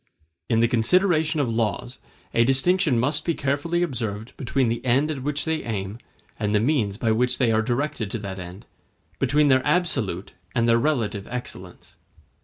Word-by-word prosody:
In 115 -2 +3
the 115 - +4
consideration 155 - +2
of 140 - +1
laws 115 +2 -2 0.3
a 115 - +4
distinction 135 +2 +3
must 145 +5 +1
be 170 - 0
carefully 145 +5 0
observed 115 -7 -4
between 130 0 0
the 115 +1 -2
end 135 +5 +2
at 140 -4 -5
which 145 +2 -2
they 160 -1 -1
aim 105 -1 -4 0.4
and 105 -1 0
the - - +4
means 110 -5 +1
by 115 -1 +1
which 125 +3 +1
they 125 -4 +2
are 110 0 +3
directed 120 -2 -2
to 115 - -3
that 100 -3 -6
end, 90 +2 -9 0.5
between 150 +1 +3
their 130 -1 +4
absolute 130 - 0 0.2
and 115 0 +2
their 115 0 +4
relative 115 -8 -1
excellence. 95 -7 -8
125 Hz, 175 wpm, -24 LUFS, 110-145 Hz, 0.5 s, the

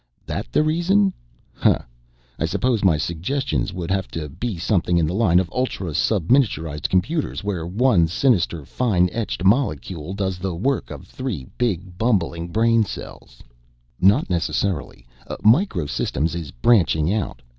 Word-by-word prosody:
"That - - -5
the - - +3
reason, 185 +5 +2 0.4
huh? - - +3 0.6
I - - +1
suppose 125 -5 0
my 85 -5 +4
suggestions 100 - -2
would 90 -1 -5
have 95 0 0
to 80 -3 -6
be 110 - -4
something 90 0 +1
in 85 - +3
the 80 - -2
line 95 -4 +3
of 95 - -1
ultra 125 -9 -2
subminiaturized 85 - +1
computers, 110 - 0
where 90 -5 -3
one 100 -3 +3
sinister 85 - +1
fine 90 - +1
etched 110 -3 -3
molecule 95 - 0
does 95 -3 -2
the 95 -1 -3
work 135 +10 -1
of - - -9
three 120 - -5
big 95 -6 -2
bumbling 85 -7 0
brain 115 +5 +3
cells?" 60 - -9 0.6
"Not 100 +10 +4
necessarily. 85 -6 -2 0.4
Micro 110 - +3
Systems 70 +4 -1
is 85 -4 -5
branching 85 - +2
out. 95 - -3
95 Hz, 145 wpm, -22 LUFS, 85-115 Hz, 0.6 s, my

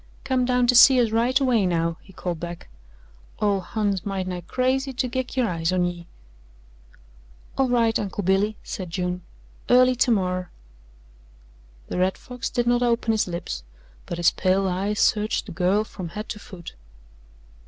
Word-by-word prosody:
"Come 260 -2 +1
down 250 0 +2
to 245 - +4
see 255 +1 +8
us 230 -3 +2
right 240 +4 +2
away 240 -8 +2
now," 165 -1 0
he 190 - -17
called 175 -2 -4
back. 170 0 -7 0.7
"Ole 205 -2 +2
Hon's 200 -1 -2
might 195 -2 -3
nigh 180 -1 -4
crazy 260 - -1
to 255 0 -1
git 255 +1 -4
her 255 -3 +2
eyes 165 -2 -1
on 180 -1 +2
ye." 175 -1 -5 1.5
"All 270 -1 +1
right, 230 -2 +2
Uncle 205 0 -3
Billy," 195 +3 +1
said 185 -3 -6
June, 180 +1 -3 0.5
"early 255 +1 +5
termorrer." 185 -7 +1 1.4
The - - -2
Red 185 +1 +1
Fox 250 -2 -6
did 240 - -1
not 240 0 +2
open 235 -1 +1
his 220 -3 +1
lips, 170 - -5 0.5
but 170 - -4
his 175 0 +4
pale 190 +1 +1
eyes 195 +4 -1
searched 215 -1 +1
the 205 - -9
girl 185 +4 +1
from 185 -5 -8
head 210 +5 -7
to 210 - -5
foot. 180 -4 -10
205 Hz, 165 wpm, -24 LUFS, 180-245 Hz, 1.5 s, see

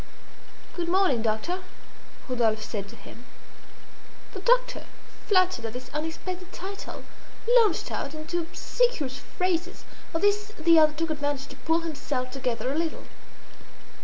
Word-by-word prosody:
"Good 345 -1 -2
morning, 365 - +4
doctor," 225 +12 -1 0.7
Rodolphe 225 -4 +1
said 205 -2 -4
to 230 - -11
him. 235 - -13 1.1
The 385 - -5
doctor, - - +2 0.4
flattered 370 - +4
at 225 - -4
this 250 +1 -7
unexpected 350 +4 -4
title, 395 +2 -7 0.6
launched 420 -7 +2
out 285 +2 -3
into 310 +3 -2
obsequious 330 - 0
phrases. 365 0 -2 0.3
Of 325 - +1
this 415 +1 +2
the 330 +1 +6
other 305 -1 +6
took 325 +1 -1
advantage 290 -2 -1
to 275 - -9
pull 325 +5 +1
himself 275 -5 -3
together 255 -1 -1
a - - -2
little. 330 -1 -2
320 Hz, 130 wpm, -27 LUFS, 260-370 Hz, 1.1 s, the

